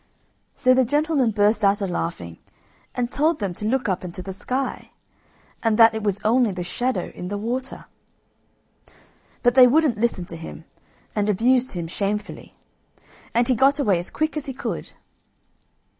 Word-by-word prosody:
So 255 -1 +4
the 260 0 +4
gentleman 290 0 +1
burst 210 +1 +2
out 200 +1 +4
a 200 - -1
laughing, 165 - -4 0.6
and 245 -1 -2
told 315 +3 +2
them 200 -4 -3
to 210 - -5
look 255 +1 0
up 190 -2 -1
into 180 0 -7
the 190 - -6
sky, 255 +7 -4 0.7
and 225 -2 +1
that 225 -1 +7
it 220 - -3
was 205 -1 0
only 235 0 +3
the 180 -1 -4
shadow 245 +8 -2
in 180 - -7
the 205 +2 -3
water. 250 +5 -4 1.6
But 245 -1 +4
they 255 -1 +8
wouldn't 275 -4 +2
listen 220 -6 0
to 170 - -8
him, 165 0 -9 0.5
and 210 0 0
abused 245 +5 +2
him 175 -3 -4
shamefully, 205 +4 -4 0.8
and 235 0 +3
he 255 - +4
got 270 +4 +3
away 205 - +2
as 175 - -2
quick 310 0 -2
as 300 -1 -3
he 270 - -4
could. - - -5
225 Hz, 170 wpm, -23 LUFS, 195-255 Hz, 1.6 s, they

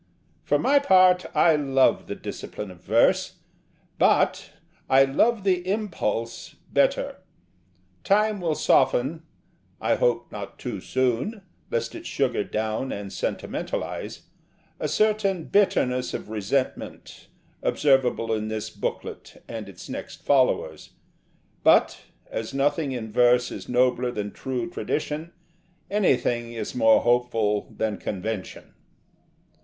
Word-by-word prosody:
For - - +2
my 285 0 +4
part, 185 -8 +5
I 165 -2 +5
love 135 -3 +2
the - - -4
discipline 105 -2 -7
of 90 - -15
verse: - - +2 0.6
but - - +2 0.4
I 135 +1 +7
love 205 +11 +2
the 185 -2 +2
impulse 170 - -3 0.2
better. - - +1 0.9
Time 210 0 +2
will 165 -3 0
soften 145 +5 +2 0.6
I - - +1
hope 120 -1 0
not 100 -1 -7
too 120 -6 -5
soon, 130 - -1 0.3
lest 115 0 -2
it - - -8
sugar 130 -6 0
down 110 +5 -2
and 100 -1 -6
sentimentalise - - -4 0.6
a - - -1
certain 210 -5 +1
bitterness 125 -12 +1
of - - -7
resentment 110 +5 -3 0.3
observable 130 -5 +2
in 110 0 -2
this 110 -1 -4
booklet - - -6
and 110 -3 -6
its 95 - -11
next - - -7
followers: 135 -3 +1 0.7
but, - - +4 0.3
as 110 +4 -5
nothing 145 +1 +1
in 115 -4 -5
verse 125 +1 +3
is - - -8
nobler 125 0 +2
than 105 -4 -4
true 130 +5 -4
tradition, 155 -1 -3 0.6
anything 125 - +1
is 115 - -5
more 280 +2 +5
hopeful 115 -4 +1
than 110 -2 -1
convention. 100 0 -5
130 Hz, 115 wpm, -25 LUFS, 115-170 Hz, 0.9 s, I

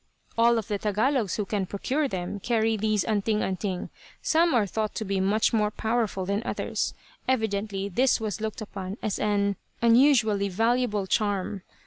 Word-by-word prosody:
"All 235 +1 +4
of 220 - -3
the 205 -1 -2
Tagalogs 215 +1 +1
who 210 - -2
can 195 -1 -2
procure 270 +10 -1
them, 185 -2 -4
carry 225 +1 +1
these 215 -1 +1
'anting 215 0 0
anting.' 190 -1 -3 0.3
Some 330 -2 +3
are 220 -4 +3
thought 215 +2 -3
to 220 - -3
be 195 -1 -1
much 205 +5 +2
more 210 -2 +2
powerful 220 -3 -1
than 200 +2 0
others. - - -2 0.3
Evidently 205 -5 0
this 250 +8 +2
was 215 -1 -3
looked 220 +2 -3
upon 195 -1 -6
as 210 -3 -1
an 200 -1 +1 0.2
unusually 230 -4 +4
valuable 225 0 +1
charm. 200 -1 0
215 Hz, 160 wpm, -26 LUFS, 200-230 Hz, 0.3 s, All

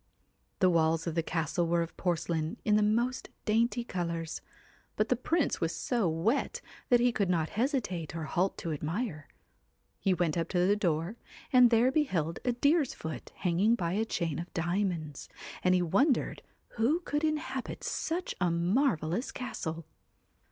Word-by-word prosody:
The 185 - +6
walls 160 -1 +2
of 165 - -2
the 165 - +1
castle 165 +1 -1
were 170 0 +2
of 165 - -9
porcelain 165 -2 -1
in 210 - +4
the 210 - +4
most 235 +5 +1 0.2
dainty 235 +2 +2
colours; 170 -6 -3 0.5
but 215 - 0
the 250 - +4
Prince 310 +5 0
was 165 0 0
so 235 -8 0
wet 170 - 0 0.3
that 245 - +6
he 245 +1 +4
could 200 -5 0
not 165 -3 +1
hesitate 210 - -1
or 165 - -3
halt 180 +5 0
to 165 - -4
admire; 155 - -3 0.7
he 190 -2 +2
went 170 -1 0
up 165 - -2
to 180 -1 +2
the 200 +2 +4
door 175 +1 -1 0.4
and 250 -1 +8
there 235 +2 +4
beheld 180 - 0
a 245 - +1
deer's 285 +3 +2
foot 160 0 -7
hanging 190 +6 +2
by 175 -6 -2
a 215 +3 +1
chain 170 -8 -2
of 175 - -6
diamonds, 170 -4 -2 0.3
and 185 0 +4
he 180 - +2
wondered 245 - +2 0.4
who 285 +10 +2
could 295 -2 -2
inhabit 300 -5 -2
such 345 +3 -2
a 180 - +3
marvellous 175 - +1
castle. 165 - -5
185 Hz, 165 wpm, -30 LUFS, 165-240 Hz, 0.7 s, and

